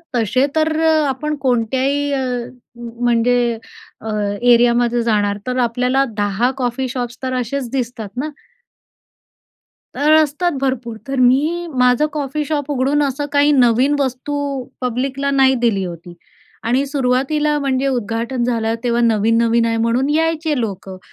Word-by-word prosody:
तसे 240 +3 +2
तर 315 0 +1 0.3
आपण 300 +3 -2
कोणत्याही 265 +3 0
अ, 270 - 0 0.6
म्हणजे 240 0 0 0.4
अ, 220 - -6 0.3
एरियामध्ये 240 0 +3
जाणार, 205 -3 +1
तर 255 0 -1
आपल्याला 250 +3 +1
10 205 +4 +1
कॉफी 255 +1 -2
शॉप्स, 245 -1 -4
तर 255 0 -2
असेच 250 +1 -4
दिसतात 240 -5 -3
ना? 310 - -3 1.7
अ, - - -6 0.2
असतात 310 +5 -1
भरपूर. 240 -4 -2
तर 270 -1 -2
मी 300 +8 +2
माझं 250 +3 +3
कॉफी 295 0 -2
शॉप 295 -1 -2
उघडून 280 +2 +1
असं 280 +1 -2
काही 285 +1 +4
नवीन 255 +1 +3
वस्तू 275 +1 -2 0.2
पब्लिकला 265 +3 -2
नाही 265 -1 +4
दिली 205 -5 +1
होती. 175 0 -9 0.5
आणि 255 +5 +1
सुरुवातीला 280 +3 0
म्हणजे 275 -1 0
उद्घाटन 235 0 -2
झालं, 230 -2 0
तेव्हा 240 -1 +1
नवीन-नवीन 230 +1 +2
आहे 230 0 0
म्हणून 235 +5 +1
यायचे 320 -2 0
लोकं. 195 -4 -5
250 Hz, 130 wpm, -18 LUFS, 235-280 Hz, 1.7 s, काही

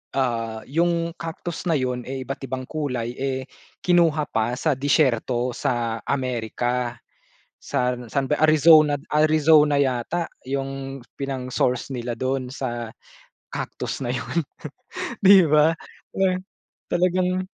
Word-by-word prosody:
ah, 115 -4 -1
yung 170 +2 +1
Cactus 165 +1 -5
na 165 - +3
yun 125 -3 -1
eh, 135 0 -4
iba't-ibang 130 -1 -5
kulay 125 -6 -3
eh, 130 -1 -2 0.4
kinuha 165 -4 +3
pa 115 +2 0
sa 150 +2 +1
disyerto 130 -4 +1
sa 115 -2 -1
Amerika, 125 -1 -1 0.7
san 125 -2 -2
san 135 -2 0
ba 150 - +2
Arizona 155 -1 +6
Arizona 150 -1 +4
yata 135 +6 0 0.2
yung 135 0 -4 0.2
pinang-source 130 -1 -2
nila 120 0 -4
dun 130 +1 -2
sa 120 -4 -4 0.6
cactus - - -4
na 120 - -1
yun. 125 +7 -3 0.8
'Di 195 -1 +8
ba 155 +1 +4 0.4
na 185 -1 +2 0.5
talagang 185 +1 +1
135 Hz, 115 wpm, -23 LUFS, 125-155 Hz, 0.8 s, Di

